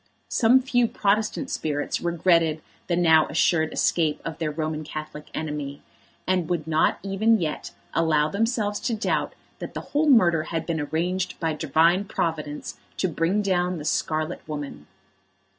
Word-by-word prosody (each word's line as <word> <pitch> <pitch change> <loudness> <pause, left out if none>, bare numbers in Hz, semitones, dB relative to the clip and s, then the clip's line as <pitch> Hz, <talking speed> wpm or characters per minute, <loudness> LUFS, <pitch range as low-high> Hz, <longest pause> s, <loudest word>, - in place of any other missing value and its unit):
Some 250 +2 +4
few 245 -2 +2
Protestant 215 +6 0
spirits 145 -2 -2
regretted 165 -2 +2 0.2
the 175 - +1
now 160 -3 +5
assured 160 0 +2
escape 160 -3 +1
of 160 -2 -5
their 160 -2 -1
Roman 155 0 -3
Catholic 155 0 -7
enemy, 150 -2 -4 0.4
and 185 -2 0
would 170 -4 -1
not 160 0 +2
even 215 +3 +2
yet 155 -3 -3 0.2
allow 155 -2 +2
themselves 210 +2 0
to 235 -1 -1
doubt 220 - -1 0.3
that - - -7
the - - -3
whole 300 +1 +3
murder 170 - +5
had 165 -1 -3
been 165 -3 -1
arranged 175 +5 -2
by 165 -2 0
Divine 160 +5 +2
Providence 155 -5 -3 0.2
to 185 - +1
bring 175 +5 0
down 180 -2 0
the 150 - -7
scarlet 155 +1 -1
woman. 145 - -6
165 Hz, 150 wpm, -25 LUFS, 155-195 Hz, 0.4 s, now